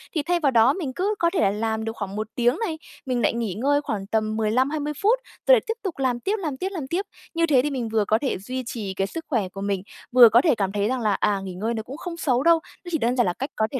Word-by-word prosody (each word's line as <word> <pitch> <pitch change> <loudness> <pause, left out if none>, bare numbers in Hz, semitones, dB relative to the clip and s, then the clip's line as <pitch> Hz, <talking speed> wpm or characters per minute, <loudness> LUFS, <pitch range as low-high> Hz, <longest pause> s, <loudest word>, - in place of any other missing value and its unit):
Thì 305 - +1
thay 350 +2 +1
vào 285 -5 +2
đó 235 +3 +5
mình 300 -8 -4
cứ 405 +4 0
có 340 - +3
thể - - +1
là 195 - +3
làm 220 +1 -2
được 225 0 -4
khoảng 200 -1 -5
1 215 0 -3
tiếng 245 +4 +2
này, 365 -9 -2 0.3
mình 250 -2 -1
lại - - +2
nghỉ 230 -5 -2
ngơi 285 +8 +1
khoảng 200 -8 -4
tầm 215 0 0
15-20 270 +7 0
phút, 455 +5 +3 0.3
rồi - - +8
lại 440 - +1
tiếp - - +2
tục 365 -7 -4
làm 250 -2 0
tiếp, 400 - -1
làm 300 -8 -3
tiếp, 380 +5 -2
làm 310 -8 -5
tiếp. 370 +7 -1 0.3
Như 335 0 +2
thế 275 -6 +4
thì 295 - -1
mình 245 -4 -3
vừa 215 -2 +1
có 220 - +3
thể 270 - -1
duy 255 +7 -5
trì 210 -5 -4
cái 195 +1 -1
sức 325 +7 -7
khỏe 220 -10 0
của 195 +1 -8
mình, 200 -2 -1 0.3
vừa 245 -2 +9
có 235 +2 +5
thể 290 -4 +3
cảm 195 -2 -1
thấy 205 0 0
rằng 255 0 -1
là, 215 -2 +2
à, 200 0 +1
nghỉ 190 - -6
ngơi 220 +6 -2
nó 220 -1 -3
cũng 270 +6 -9
không 340 -1 -6
xấu 260 -4 +1
đâu. 335 -1 +5 0.3
Nó - - -6
chỉ 320 - +1
đơn 240 -1 0
giản 245 - +3
là 180 - 0
cách 270 - -4
có 220 0 +1
thể 265 - -2
250 Hz, 305 wpm, -24 LUFS, 215-305 Hz, 0.3 s, vừa